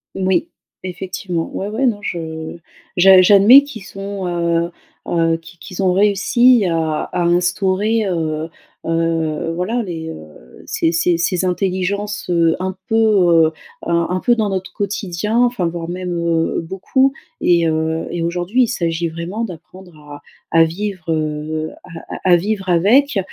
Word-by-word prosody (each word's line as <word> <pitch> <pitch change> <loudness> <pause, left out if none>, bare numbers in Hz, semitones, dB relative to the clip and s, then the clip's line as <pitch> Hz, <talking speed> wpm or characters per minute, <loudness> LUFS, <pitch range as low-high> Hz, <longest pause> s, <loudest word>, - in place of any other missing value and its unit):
Moui, 190 - 0 0.3
effectivement, 180 -2 -4
ouais, 195 - -3
ouais, 230 +6 -1
non, 220 -5 0
je 160 -4 -5 0.4
j'a 190 +1 +8
j'admets 205 +8 +7
qu'ils 245 -8 -9
sont, 195 -1 -6
heu 170 -1 0 0.4
heu, 165 -1 +1
qu 165 +2 -16
qu'ils 185 +2 -7
ont 185 -1 +3
réussi 210 +4 +4
à 160 -3 -1
à - - 0
instaurer, 185 +5 +1
heu 160 -3 -2 0.3
heu, 165 -1 -1
voilà 225 +7 -1
les 165 -4 -6
heu, 75 - -13
ces 165 - 0
ces 170 +1 +1
ces 180 +1 0
intelligences, 195 +3 -2
heu, 165 -2 +3
un 185 0 -3
peu, 225 - +1
heu, 180 -8 +4 0.3
un 170 0 +1
un 180 +1 -1
peu 240 +5 +2
dans 215 -3 0
notre 190 -1 -4
quotidien, 205 +1 -2
enfin 240 -8 +1
voire 165 0 -5
même, 180 0 -4
heu, 165 -1 0
beaucoup 260 +10 0 0.3
et 170 -2 +3
heu, 160 +1 -1
et 175 - -4
aujourd'hui 175 +8 0
il 235 - +1
s'agit 170 -6 -1
vraiment 170 +7 -5
d'apprendre 180 -1 -12
à 145 -1 -12 0.3
à 165 0 +5
vivre, 180 -1 -4
heu, 155 0 -3
à - - -15 0.4
à 185 - +4
à - - +8
vivre 195 +1 -3
avec, 210 - +3
180 Hz, 155 wpm, -18 LUFS, 165-200 Hz, 0.4 s, j'a